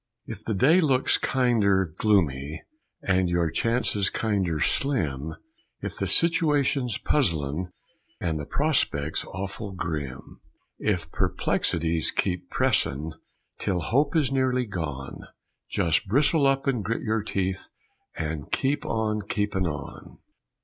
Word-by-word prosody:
If 105 Hz, -3 st, -8 dB
the 110 Hz, -, -2 dB
day 150 Hz, -, +5 dB
looks 135 Hz, -5 st, +3 dB
kinder 110 Hz, -7 st, +2 dB
gloomy 80 Hz, -8 st, +1 dB, 0.4 s
And 95 Hz, -2 st, +2 dB
your 85 Hz, -2 st, +1 dB
chances 115 Hz, -3 st, +1 dB
kinder 95 Hz, -8 st, 0 dB
slim, 80 Hz, -, 0 dB, 0.4 s
If -, -, -5 dB
the -, -, -2 dB
situation's 150 Hz, -7 st, +2 dB
puzzlin' 85 Hz, -, 0 dB, 0.5 s
And 80 Hz, -2 st, -1 dB
the 75 Hz, -, -6 dB
prospect's 130 Hz, -, 0 dB
awful 100 Hz, +2 st, -6 dB
grim, 75 Hz, -7 st, -5 dB, 0.4 s
If 90 Hz, -6 st, -1 dB
perplexities 80 Hz, -1 st, 0 dB
keep 90 Hz, -1 st, -1 dB
pressin' 75 Hz, +4 st, +1 dB, 0.5 s
Till 90 Hz, -, 0 dB
hope 140 Hz, -, +1 dB
is 150 Hz, -5 st, +2 dB
nearly 130 Hz, -2 st, +1 dB
gone, 80 Hz, -, -5 dB, 0.5 s
Just 85 Hz, +2 st, +1 dB
bristle 140 Hz, -, +3 dB
up 135 Hz, 0 st, +1 dB
and 125 Hz, -6 st, 0 dB
grit 115 Hz, +4 st, -2 dB
your 110 Hz, -1 st, 0 dB
teeth 95 Hz, -3 st, -2 dB, 0.5 s
And 75 Hz, -2 st, -4 dB
keep 140 Hz, +2 st, 0 dB
on 110 Hz, -1 st, 0 dB
keepin' 100 Hz, -4 st, 0 dB
on. 75 Hz, -3 st, -7 dB
100 Hz, 120 wpm, -26 LUFS, 80-125 Hz, 0.5 s, day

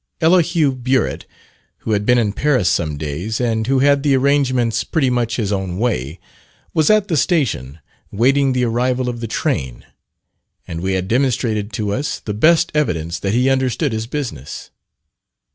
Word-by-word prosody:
Elihu 165 Hz, -3 st, +3 dB
Burritt, 130 Hz, 0 st, -1 dB, 0.5 s
who -, -, -4 dB
had 105 Hz, -1 st, 0 dB
been 125 Hz, -, +5 dB
in 105 Hz, -4 st, +1 dB
Paris 130 Hz, -5 st, +1 dB
some 75 Hz, -3 st, -1 dB
days, 80 Hz, +9 st, -4 dB
and 115 Hz, -2 st, -1 dB
who 135 Hz, +1 st, +2 dB
had 140 Hz, +1 st, +3 dB
the 140 Hz, -1 st, +2 dB
arrangements 130 Hz, -4 st, +1 dB
there -, -, -10 dB
pretty 140 Hz, -7 st, +2 dB
much 120 Hz, -1 st, 0 dB
his 105 Hz, -5 st, -2 dB
own 95 Hz, -3 st, -2 dB
way, 90 Hz, -, -2 dB, 0.5 s
was 155 Hz, -2 st, +2 dB
at 215 Hz, -1 st, +3 dB
the 170 Hz, -, 0 dB
station 130 Hz, -, 0 dB, 0.3 s
waiting 135 Hz, +5 st, +2 dB
the 125 Hz, 0 st, 0 dB
arrival 125 Hz, +2 st, 0 dB
of 120 Hz, -1 st, -3 dB
the 115 Hz, -, -4 dB
train, 80 Hz, -, -3 dB, 0.8 s
and 85 Hz, 0 st, -5 dB
we 95 Hz, +1 st, -1 dB
had 95 Hz, 0 st, -2 dB
demonstrated 115 Hz, -3 st, 0 dB
to 105 Hz, -1 st, -2 dB
us, 145 Hz, +7 st, -3 dB
the 105 Hz, -, -5 dB
best 165 Hz, +10 st, +3 dB
evidence 85 Hz, -, -1 dB
that 100 Hz, +3 st, -1 dB
he 125 Hz, +2 st, +2 dB
understood 130 Hz, +2 st, +1 dB
his 110 Hz, +1 st, -3 dB
business. 125 Hz, -, -6 dB
120 Hz, 170 wpm, -18 LUFS, 100-140 Hz, 0.8 s, been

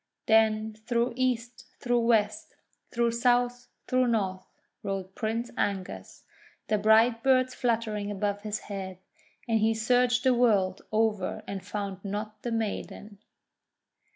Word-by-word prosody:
Then 220 Hz, 0 st, +3 dB
through 235 Hz, +3 st, -1 dB
East, 255 Hz, 0 st, -2 dB
through 245 Hz, -1 st, +1 dB
West, 215 Hz, -2 st, +1 dB, 0.3 s
through 235 Hz, -1 st, +1 dB
South, 245 Hz, +1 st, +1 dB, 0.2 s
through 255 Hz, -1 st, +2 dB
North, 190 Hz, -5 st, -1 dB, 0.3 s
rode 195 Hz, -1 st, -4 dB
Prince 230 Hz, +3 st, -2 dB
Angus, 185 Hz, -, -3 dB, 0.5 s
the 215 Hz, -1 st, +2 dB
bright 225 Hz, +2 st, +4 dB
birds 255 Hz, -1 st, +3 dB
fluttering 220 Hz, -4 st, -1 dB
above 205 Hz, 0 st, -2 dB
his 210 Hz, 0 st, -4 dB
head, 190 Hz, -2 st, -6 dB, 0.5 s
and 225 Hz, -1 st, +2 dB
he 220 Hz, +1 st, +2 dB
searched 245 Hz, +2 st, +2 dB
the 260 Hz, -1 st, +4 dB
world 205 Hz, -6 st, +2 dB
over 215 Hz, -3 st, 0 dB
and 195 Hz, -2 st, -5 dB
found 200 Hz, -1 st, -5 dB
not 210 Hz, +1 st, -5 dB
the 240 Hz, -, -3 dB
maiden. 210 Hz, -2 st, -4 dB
220 Hz, 125 wpm, -28 LUFS, 205-240 Hz, 0.5 s, bright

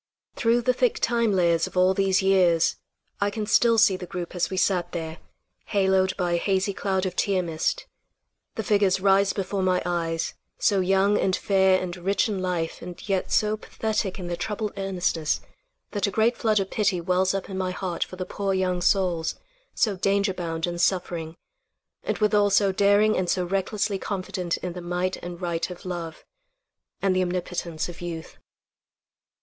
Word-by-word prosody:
Through 235 Hz, +1 st, +2 dB
the 255 Hz, -, +3 dB
thick 480 Hz, -, +2 dB
time 235 Hz, -, +1 dB
layers 170 Hz, -3 st, +2 dB
of -, -, -9 dB
all 185 Hz, +1 st, +5 dB
these 195 Hz, 0 st, +2 dB
years, 180 Hz, -4 st, +3 dB, 0.4 s
I 205 Hz, -, +2 dB
can 210 Hz, +1 st, -4 dB
still 230 Hz, +2 st, +4 dB
see 205 Hz, -3 st, +5 dB
the 185 Hz, -1 st, -7 dB
group 175 Hz, 0 st, -5 dB
as 180 Hz, -, 0 dB
we 190 Hz, -, -4 dB
sat 180 Hz, -2 st, +1 dB
there, 160 Hz, -1 st, -5 dB, 0.5 s
haloed 190 Hz, -1 st, +2 dB
by 180 Hz, -2 st, 0 dB
a 170 Hz, -, +2 dB
hazy 195 Hz, +2 st, 0 dB
cloud 190 Hz, -1 st, -1 dB
of 180 Hz, -1 st, -3 dB
tear 190 Hz, -2 st, +1 dB
mist. 165 Hz, -, -2 dB, 0.7 s
The 220 Hz, -, -3 dB
figures 200 Hz, -2 st, +2 dB
rise 195 Hz, 0 st, +4 dB
before 195 Hz, 0 st, -2 dB
my 185 Hz, -1 st, +2 dB
eyes, 165 Hz, -2 st, -1 dB, 0.2 s
so 200 Hz, -3 st, +2 dB
young 195 Hz, +2 st, +3 dB
and 190 Hz, -1 st, +2 dB
fair 190 Hz, -1 st, +3 dB
and 180 Hz, -1 st, -4 dB
rich 195 Hz, +5 st, +1 dB
in 200 Hz, -4 st, -2 dB
life 175 Hz, -3 st, -2 dB
and 175 Hz, +3 st, -9 dB
yet 195 Hz, -2 st, -1 dB
so 215 Hz, 0 st, +2 dB
pathetic 215 Hz, -3 st, -2 dB
in 185 Hz, -, -6 dB
their 175 Hz, 0 st, -2 dB
troubled 210 Hz, +4 st, -3 dB
earnestness 180 Hz, -5 st, -1 dB, 0.5 s
that 205 Hz, -1 st, 0 dB
a -, -, 0 dB
great 220 Hz, +4 st, +2 dB
flood 215 Hz, -3 st, +2 dB
of 195 Hz, -1 st, -3 dB
pity 200 Hz, -4 st, +1 dB
wells 185 Hz, +2 st, +1 dB
up 195 Hz, -, -3 dB
in 195 Hz, -, -6 dB
my 185 Hz, -1 st, -1 dB
heart 185 Hz, -1 st, -2 dB
for -, -, -10 dB
the 185 Hz, 0 st, -4 dB
poor 195 Hz, +1 st, -2 dB
young 185 Hz, -1 st, 0 dB
souls, 175 Hz, -3 st, +1 dB, 0.4 s
so 210 Hz, -3 st, +1 dB
danger 200 Hz, +1 st, +1 dB
bound 165 Hz, -3 st, -3 dB
and 175 Hz, -1 st, -3 dB
suffering, 175 Hz, -3 st, -1 dB, 0.6 s
and -, -, -2 dB
withal 210 Hz, -1 st, +3 dB
so 200 Hz, 0 st, +3 dB
daring 205 Hz, +2 st, +4 dB
and 185 Hz, -1 st, -1 dB
so 180 Hz, -1 st, +1 dB
recklessly 195 Hz, +2 st, -1 dB
confident 185 Hz, -3 st, -3 dB
in 180 Hz, -1 st, -5 dB
the 180 Hz, -, -7 dB
might 180 Hz, +1 st, -2 dB
and 175 Hz, +1 st, -8 dB
right 170 Hz, 0 st, -1 dB
of 180 Hz, 0 st, -10 dB
love, 170 Hz, -3 st, -6 dB, 0.8 s
and 190 Hz, -1 st, +2 dB
the 185 Hz, -, +2 dB
omnipotence 175 Hz, -2 st, -3 dB
of 175 Hz, -1 st, -10 dB
youth. 165 Hz, -2 st, -7 dB
185 Hz, 185 wpm, -25 LUFS, 175-200 Hz, 0.8 s, all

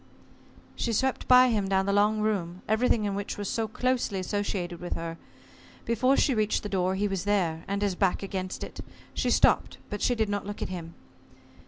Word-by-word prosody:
She 235 Hz, -, -1 dB
swept 265 Hz, +4 st, 0 dB
by 255 Hz, 0 st, +7 dB
him 210 Hz, -4 st, 0 dB
down 190 Hz, 0 st, +2 dB
the 200 Hz, -, +1 dB
long 210 Hz, +1 st, +3 dB
room, 185 Hz, -4 st, -2 dB
everything 220 Hz, 0 st, +2 dB
in 200 Hz, -, -1 dB
which 200 Hz, +1 st, -4 dB
was 205 Hz, -1 st, -4 dB
so 225 Hz, +2 st, -1 dB
closely 250 Hz, -3 st, -1 dB
associated 185 Hz, -3 st, -2 dB
with 175 Hz, -, -4 dB
her. 165 Hz, 0 st, -5 dB, 0.7 s
Before 255 Hz, +4 st, +2 dB
she 275 Hz, -, +3 dB
reached 215 Hz, -2 st, +1 dB
the 205 Hz, -, -4 dB
door, 185 Hz, -1 st, 0 dB
he 205 Hz, +2 st, +1 dB
was 195 Hz, -3 st, -2 dB
there 180 Hz, -6 st, 0 dB
and 200 Hz, +1 st, -1 dB
his 200 Hz, -2 st, +1 dB
back 190 Hz, +1 st, +1 dB
against 190 Hz, -1 st, -4 dB
it. -, -, -8 dB, 0.3 s
She -, -, 0 dB
stopped, -, -, +3 dB
but 205 Hz, -, -4 dB
she 245 Hz, -, +2 dB
did 220 Hz, -2 st, +1 dB
not 205 Hz, 0 st, -3 dB
look 205 Hz, -, -5 dB
at -, -, -3 dB
him. 170 Hz, -3 st, -7 dB
205 Hz, 200 wpm, -28 LUFS, 185-220 Hz, 0.7 s, by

